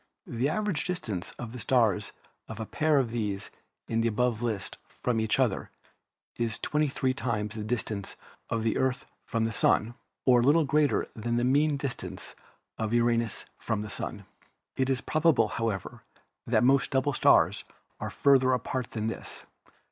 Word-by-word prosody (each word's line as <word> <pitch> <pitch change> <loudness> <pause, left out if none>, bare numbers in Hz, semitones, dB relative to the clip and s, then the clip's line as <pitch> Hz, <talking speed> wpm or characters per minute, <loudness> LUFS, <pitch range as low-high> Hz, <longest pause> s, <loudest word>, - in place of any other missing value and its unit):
The 120 +4 -1
average 205 -2 -1
dis 180 -1 -1
tance 95 - -4
of 120 -2 -7
the 125 - -7
stars 105 -3 +2 0.4
of 110 - -8
a 110 - -3
pair 155 +5 +2
of 125 -4 +1
those 105 -4 -3 0.4
in 115 0 0
the 115 - +2
above 115 0 0
list 110 -5 -3
from 120 -2 -2
each 110 -1 +1
other - - +1 0.7
is 115 -2 -1
23 140 -3 0
times 105 -5 -2
the 110 -2 -5
distance 105 -3 -3 0.3
of 115 -1 -1
the 110 - +1
Earth 130 0 0 0.2
from 115 -1 0
the 115 - -2
Sun, 110 +2 +2 0.3
or 125 -2 +6
a - - +1
little 150 +4 +5
greater 150 0 +2
than 120 +2 -2
the 120 - +1
mean 145 +3 +3
distance 140 -3 -5 0.5
of 110 +1 0
Uranus 115 -1 +1
from 110 -2 -2
the 105 - -7
Sun. 100 -2 -5 0.5
It 130 0 0
is 130 -2 +1
probable, 155 -2 +3
however, 115 -5 -3 0.5
that - - +3
most 135 +2 +4
double 135 +1 +1
stars - - +4 0.4
are - - -3
farther 130 -2 +4
apart 125 0 -2
than 110 -1 -3
this. 115 - -5
120 Hz, 170 wpm, -28 LUFS, 110-135 Hz, 0.7 s, or